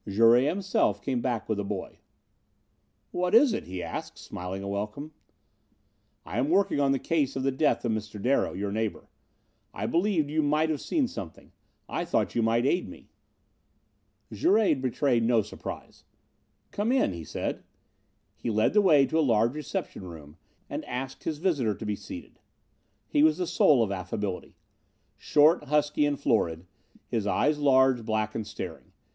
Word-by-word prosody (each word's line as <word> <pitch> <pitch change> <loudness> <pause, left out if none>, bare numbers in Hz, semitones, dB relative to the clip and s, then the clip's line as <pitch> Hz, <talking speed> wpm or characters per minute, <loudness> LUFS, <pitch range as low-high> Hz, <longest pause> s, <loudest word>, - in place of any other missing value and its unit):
Jouret, 115 +5 +5
himself, 185 - +1
came 125 +3 -2
back 120 -4 -2
with 110 -2 -1
the - - -1
boy. 100 -1 -6 1.1
"What 180 +3 0
is 245 0 +6
it?" - - -3
he 90 -1 -6
asked, - - -6
smiling 90 +2 -6
a - - -5
welcome. 105 +9 -4 1.1
"I 105 - -3
am 135 +4 +1
working 190 -4 +2
on 140 -1 +3
the 135 - +2
case 140 -1 0
of 135 - -2
the 135 - +2
death 135 0 +1
of 115 - +1
Mr. 110 -1 -4
Darrow, 125 +7 +1
your 100 +1 -3
neighbor. 110 0 -3 0.7
I 100 - -3
believed 170 - +1
you 155 +1 +2
might 155 +2 +1
have 150 - -3
seen 290 -6 0
something. 85 - -9 0.4
I - - -2
thought - - 0
you 115 - +1
might 115 +2 +2
aid 175 +6 +1
me." - - -14 1.2
Jouret 220 - +3
betrayed 130 -1 +1
no 115 -1 +3
surprise. 105 - -9 0.7
"Come 210 +4 -1
in," 260 - +2
he 85 -1 -7
said. - - -4 0.7
He - - -4
led 110 0 +2
the 210 - +5
way 150 -8 +5
to 160 - 0
a - - +4
large 115 -3 +2
reception 150 -8 -5
room 80 -4 -11 0.3
and - - -5
asked 130 +1 -6
his 155 -2 -2
visitor 145 - 0
to 110 - -8
be 105 -1 -1
seated. - - -10 0.7
He 145 - +2
was 155 0 +4
the 180 - -1
soul 150 -7 +4
of 105 - -2
affability. 95 0 -4 0.6
Short, 150 +2 +3
husky 150 0 +2
and 145 -1 -2
florid. 85 - 0 0.4
His 110 -3 -2
eyes 150 +7 +1
large, 130 -3 +4
black 110 0 -1
and 110 -2 -4
staring. - - -8
130 Hz, 170 wpm, -27 LUFS, 105-150 Hz, 1.2 s, is